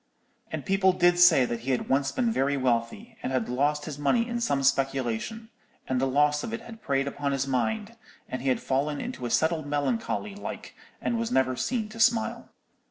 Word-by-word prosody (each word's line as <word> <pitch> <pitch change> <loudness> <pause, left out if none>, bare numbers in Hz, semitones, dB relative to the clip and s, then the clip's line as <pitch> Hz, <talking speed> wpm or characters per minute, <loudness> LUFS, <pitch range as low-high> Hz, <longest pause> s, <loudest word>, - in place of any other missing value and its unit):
And - - -4
people 195 -1 +3
did 175 -1 +3
say 170 -7 +7
that 120 -1 -3
he 120 +4 -6
had 130 - 0
once 135 +1 +1
been 240 -2 0
very 140 -7 +1
wealthy, 130 - -1
and - - -3
had 130 -4 0
lost 145 +4 0
his 145 -2 -6
money 230 - +2
in 235 0 -3
some 140 -12 0
speculation; 135 - 0 0.4
and 130 -1 0
the 135 - +2
loss 145 +2 +2
of 220 - -4
it 230 - -4
had 225 -1 -11
preyed 140 -1 0
upon 140 0 -2
his 135 -1 0
mind, 210 - -1 0.3
and 130 - -5
he 135 - 0
had 130 - +1
fallen 140 +2 -1
into 125 - -4
a - - -5
settled 155 +5 +1
melancholy 200 - -1
like, 205 - -7 0.3
and 235 - 0
was 230 0 -2
never 130 -1 +2
seen 225 - -1
to 225 +1 -10
smile.' 225 0 +2
145 Hz, 205 wpm, -27 LUFS, 130-215 Hz, 0.4 s, say